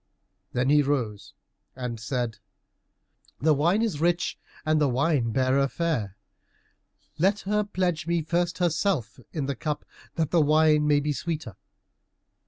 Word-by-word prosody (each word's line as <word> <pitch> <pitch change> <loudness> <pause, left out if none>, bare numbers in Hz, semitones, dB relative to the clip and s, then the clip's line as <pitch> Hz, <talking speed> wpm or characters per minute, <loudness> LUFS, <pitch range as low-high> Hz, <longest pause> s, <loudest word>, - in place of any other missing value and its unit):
Then 125 +2 +1
he 150 0 +6
rose 125 -8 -2 0.4
and 125 -3 -5
said, 120 -2 -3 1.0
"The 155 +2 +4
wine 170 +10 +2
is 180 -10 -2
rich, 175 +1 +1 0.3
and 155 0 +2
the 145 - +3
wine 135 -1 +1
bearer 130 +2 +2
fair. 135 - -2 1.0
Let 195 +5 +2
her 210 +2 0
pledge 180 -5 -1
me 170 -1 +1
first 175 +2 0
herself 170 - 0
in 150 -4 -2
the 140 0 -2
cup 150 0 -3 0.3
that 160 -2 -1
the 170 - +4
wine 150 0 +4
may 145 -1 +4
be 150 +1 -1
sweeter." 155 - -4
150 Hz, 140 wpm, -26 LUFS, 135-170 Hz, 1.0 s, he